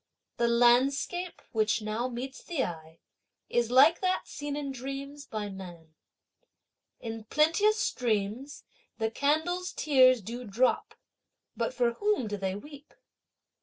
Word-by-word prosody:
The 235 - +2
landscape, 265 +9 +2
which 215 0 +1
now 215 +4 -2
meets 255 +2 -6
the 330 -7 -1
eye, 160 -1 -8 0.5
is 240 -1 +1
like 275 +7 +6
that 370 0 0
seen 290 -1 -5
in 285 -2 -3
dreams 275 +2 -7
by 215 -2 -4
man. 175 -5 -10 1.1
In 225 -1 -6
plenteous 330 - +3
streams 235 - -2 0.3
the 220 -1 -1
candles' 315 +8 0
tears 255 -4 +4
do 240 +5 -6
drop, 240 +4 0 0.6
but - - -1
for 240 - +1
whom 410 - 0
do 205 - -3
they 190 -1 -2
weep? 285 +6 -12
255 Hz, 130 wpm, -29 LUFS, 220-290 Hz, 1.1 s, like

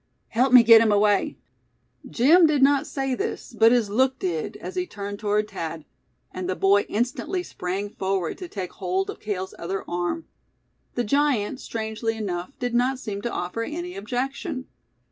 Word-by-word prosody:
"Help 250 +3 +2
me 250 -2 +9
get 225 -1 +8
him 225 -2 +3
away!" 205 -1 +2 0.7
Jim 315 - +6
did 295 -3 +2
not 280 +1 +4
say 270 -1 -2
this, 250 - -4
but 225 +1 +6
his 240 -3 +3
look 260 +6 +2
did, 170 -7 -3
as - - -7
he 365 0 -2
turned 205 -4 -6
toward 210 0 0
Thad; 165 -4 -5 0.5
and 185 0 -5
the 185 - 0
boy 200 +2 +3
instantly 250 - -1
sprang 190 - -4
forward 190 - -2
to 365 - -6
take 190 - -5
hold 190 0 -1
of - - -12
Cale's 190 -3 -4
other 190 +3 -4
arm. 175 - -2 0.7
The 245 - 0
giant, 265 -2 +1
strangely 225 0 -3
enough, 185 +2 -4
did 245 -1 -3
not 250 +2 +2
seem 205 -5 -5
to 235 - -3
offer 180 +6 -3
any 345 +8 -5
objection. 255 +4 -3
220 Hz, 170 wpm, -24 LUFS, 195-260 Hz, 0.7 s, me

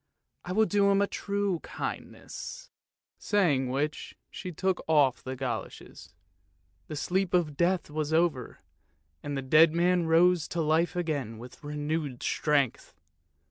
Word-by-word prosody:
I 180 - -6
will 220 +4 +3
do 200 -1 +2
him 200 0 +3
a 200 - +3
true 200 -3 -2
kindness! - - -7 0.2
" - - -65
saying 150 -11 +1
which 145 +4 -3
she 185 - -6
took 185 +2 -1
off 145 -5 +3
the 130 0 -5
goloshes; 130 -2 -6 0.7
the 155 - -6
sleep 185 +4 0
of 160 -5 +1
death 175 +3 +1
was 155 0 -2
over 160 -6 0 0.3
— 80 - -44
the 145 -2 -3
dead 155 +4 +5
man 175 0 +2
rose 170 +1 +4
to 170 - -2
life 160 +2 +1
again 145 -10 -2
with 125 +5 -12
renewed 150 -2 -3
strength. 145 -5 0
160 Hz, 140 wpm, -28 LUFS, 145-180 Hz, 0.7 s, dead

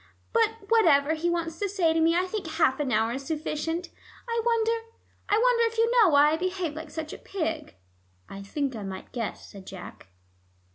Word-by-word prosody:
But 450 -2 +1
whatever 320 -10 +4
he 325 +2 -1
wants 330 -1 -2
to 405 - -1
say 355 -5 +2
to 325 - +1
me, 330 +1 +4
I 360 +1 +2
think 380 -1 -4
half 315 -4 +1
an 280 -3 -1
hour 220 +1 +2
is 265 +3 -4
sufficient. 320 +3 -3 0.4
I 465 0 0
wonder 460 -1 +2 0.6
I 415 - +4
wonder 475 0 +4
if 460 - -11
you 460 +1 +3
know 465 -6 +6
why 295 0 +5
I 315 - +1
behaved 365 -3 -2
like 315 0 -7
such 315 -1 -6
a - - -9
pig." 325 -5 -4 0.5
"I 195 - -8
think 265 +6 -3
I 215 - -6
might 190 -1 -7
guess," 230 -4 -5
said 195 -2 -12
Jack. 180 - -10
325 Hz, 200 wpm, -27 LUFS, 285-405 Hz, 0.6 s, know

